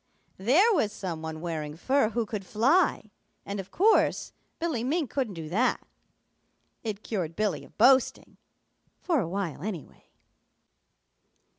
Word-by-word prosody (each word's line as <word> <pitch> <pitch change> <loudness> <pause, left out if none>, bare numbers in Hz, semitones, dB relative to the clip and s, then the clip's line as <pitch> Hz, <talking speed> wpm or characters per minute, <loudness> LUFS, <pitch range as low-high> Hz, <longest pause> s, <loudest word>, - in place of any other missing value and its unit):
There 320 - +4
was 255 - +1
some 175 -6 -5
one 160 0 -6
wearing 155 -3 -4
fur 265 +4 +2
who 230 0 -1
could 210 -2 -5
fly, 230 - +2 0.3
and 200 0 -4
of 195 0 -7
course 425 - +2 0.2
Billy 325 -9 -2
Mink 290 0 -1
couldn't 250 -9 -2
do 160 -2 -6
that. 235 +9 +1 1.0
It 215 -2 -4
cured 175 -7 -3
Billy 210 0 -1
of - - -18
boasting, 260 +3 +3 0.7
for 335 -5 +2
a 175 -8 -2
while, 185 -5 -3
anyway. 185 -5 -7
215 Hz, 135 wpm, -28 LUFS, 180-265 Hz, 1.0 s, There